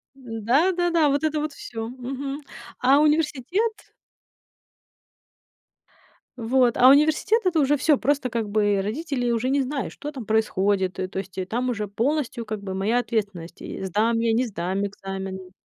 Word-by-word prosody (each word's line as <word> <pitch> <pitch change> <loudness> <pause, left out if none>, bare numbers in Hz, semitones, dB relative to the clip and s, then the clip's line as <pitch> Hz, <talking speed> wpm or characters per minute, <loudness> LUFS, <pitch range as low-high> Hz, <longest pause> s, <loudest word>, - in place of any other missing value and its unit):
Н-да, 250 - +1
да-да. 340 -4 +2
Вот 280 +1 0
это 310 -1 0
вот 300 -1 -3
всё. 225 -4 -6
Мгм. 270 +3 -5 0.4
А 270 +3 +5
университет 310 - 0 2.5
Вот, 245 +1 +2
а 250 - +7
университет 310 - +4
это 355 -3 +2
уже 290 0 +3
всё, 295 +1 +3
просто 270 0 0
как 225 -3 -2
бы 205 -1 +2
родители 245 +3 -2
уже 235 +2 0
не 280 +1 +2
знают, 270 +1 -3
что 295 - -7
там 260 -6 -7
происходит. 200 -3 +1
И 185 - -1
то 190 - -5
есть 190 -1 -8
и 185 - -2
там 245 +6 -2
уже 215 -4 -2
полностью 235 +3 -1
как 215 -1 -5
бы 190 -1 -4
моя 205 +6 +1
ответственность 200 -8 -3
и - - -6
сдам 215 +5 +1
я, 230 0 +2
не 245 +3 +2
сдам 190 -2 -2
экзамен. 195 -2 -6
245 Hz, 160 wpm, -24 LUFS, 205-285 Hz, 2.5 s, а